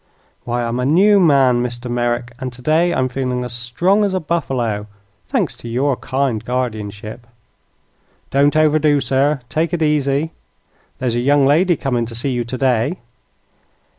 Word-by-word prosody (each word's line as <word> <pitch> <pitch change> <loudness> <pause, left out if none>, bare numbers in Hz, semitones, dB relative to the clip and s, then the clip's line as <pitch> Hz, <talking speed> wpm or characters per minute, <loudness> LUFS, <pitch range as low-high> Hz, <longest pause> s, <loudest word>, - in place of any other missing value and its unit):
"Why, 120 0 -1
I'm 120 +1 -2
a 125 - 0
new 200 +7 +5
man, 135 -8 +4
Mr. 120 0 -4
Merrick, 120 0 -2
and 130 -1 -4
today 155 +8 +1
I'm 130 -6 +1
feeling 125 -1 -2
as 125 -1 -6
strong 170 - +1
as 195 -2 0
a - - +1
buffalo 125 - -2 0.4
thanks - - -1
to 120 - -9
your 130 +4 +1
kind 130 -4 -2
guardianship." 110 -2 -4 1.0
"Don't 140 +2 +3
overdo, 155 -1 +3
sir. 135 +2 +1
Take 160 +6 -1
it 165 - -1
easy. 150 0 +1 0.7
There's 125 -2 -1
a 120 - 0
young 140 +2 +3
lady 170 +6 +3
coming 120 -4 -1
to 115 - -8
see 125 +4 -2
you 120 -1 -1
today." 130 +5 0
130 Hz, 155 wpm, -18 LUFS, 120-150 Hz, 1.0 s, new